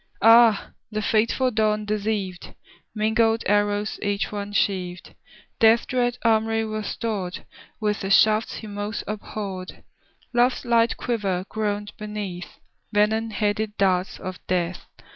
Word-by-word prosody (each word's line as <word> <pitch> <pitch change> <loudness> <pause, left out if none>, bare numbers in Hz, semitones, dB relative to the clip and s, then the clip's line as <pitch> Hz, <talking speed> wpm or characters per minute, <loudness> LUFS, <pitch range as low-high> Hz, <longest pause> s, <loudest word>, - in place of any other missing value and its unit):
Ah, 225 -1 +6 0.2
the 215 - -2
fateful 230 +4 +2
dawn 215 -1 +1
deceived! 205 -3 -3 0.4
Mingled 225 +1 +2
arrows 205 +1 +1
each 205 0 -1
one 205 -1 -5
sheaved; 185 -3 -1 0.5
Death's 225 +1 +5
dread 245 -1 0
armoury 225 0 +2
was 215 -1 -4
stored 200 -6 -4 0.3
With 210 -1 0
the 195 - -4
shafts 215 +2 +4
he - - -7
most 205 +1 -4
abhorred; 200 -3 -6 0.5
Love's 245 +1 +2
light 235 -1 +3
quiver 195 -6 -1
groaned 210 -1 -2
beneath 210 -4 -6 0.3
Venom 220 +2 +2
headed 210 0 -1
darts 185 -1 +1
of 185 -1 -6
Death. 180 -1 -1
210 Hz, 125 wpm, -24 LUFS, 200-225 Hz, 0.5 s, Ah